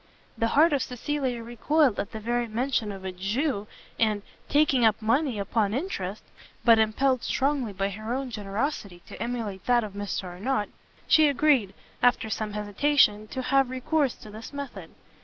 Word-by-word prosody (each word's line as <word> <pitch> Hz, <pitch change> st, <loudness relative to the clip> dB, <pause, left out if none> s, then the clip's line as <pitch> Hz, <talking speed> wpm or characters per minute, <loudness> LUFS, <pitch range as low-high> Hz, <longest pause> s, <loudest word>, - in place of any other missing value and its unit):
The 230 Hz, -1 st, +1 dB
heart 315 Hz, +1 st, +6 dB
of 280 Hz, -, +2 dB
Cecilia 255 Hz, -1 st, -2 dB
recoiled 245 Hz, +3 st, +1 dB
at 200 Hz, -, -3 dB
the 220 Hz, -, -6 dB
very 240 Hz, +2 st, -1 dB
mention 230 Hz, -1 st, -1 dB
of 190 Hz, -1 st, -8 dB
a 190 Hz, -, -2 dB
Jew, 205 Hz, -, -2 dB, 0.3 s
and 215 Hz, -3 st, +1 dB, 0.3 s
taking 285 Hz, -4 st, +3 dB
up 220 Hz, -1 st, +4 dB
money 235 Hz, +3 st, +1 dB
upon 205 Hz, +1 st, 0 dB
interest; 215 Hz, -, -4 dB, 0.4 s
but, 230 Hz, -2 st, +7 dB
impelled 250 Hz, +4 st, +2 dB
strongly 270 Hz, -4 st, 0 dB
by 195 Hz, 0 st, -1 dB
her 215 Hz, +3 st, -6 dB
own 260 Hz, 0 st, -2 dB
generosity 205 Hz, -, -3 dB
to -, -, -10 dB
emulate 225 Hz, -5 st, -4 dB
that 245 Hz, -1 st, +4 dB
of 210 Hz, -2 st, -6 dB
Mr 205 Hz, -1 st, -3 dB
Arnott, 205 Hz, +5 st, -2 dB, 0.4 s
she 315 Hz, -1 st, +6 dB
agreed, 275 Hz, -8 st, +2 dB, 0.3 s
after 245 Hz, -3 st, +3 dB
some 215 Hz, -1 st, -3 dB
hesitation, 210 Hz, +1 st, +2 dB
to 260 Hz, +4 st, -5 dB
have 270 Hz, 0 st, +3 dB
recourse 260 Hz, +2 st, 0 dB
to 215 Hz, -, -13 dB
this 220 Hz, +2 st, -9 dB
method. 280 Hz, -1 st, -7 dB
230 Hz, 165 wpm, -27 LUFS, 210-270 Hz, 0.4 s, but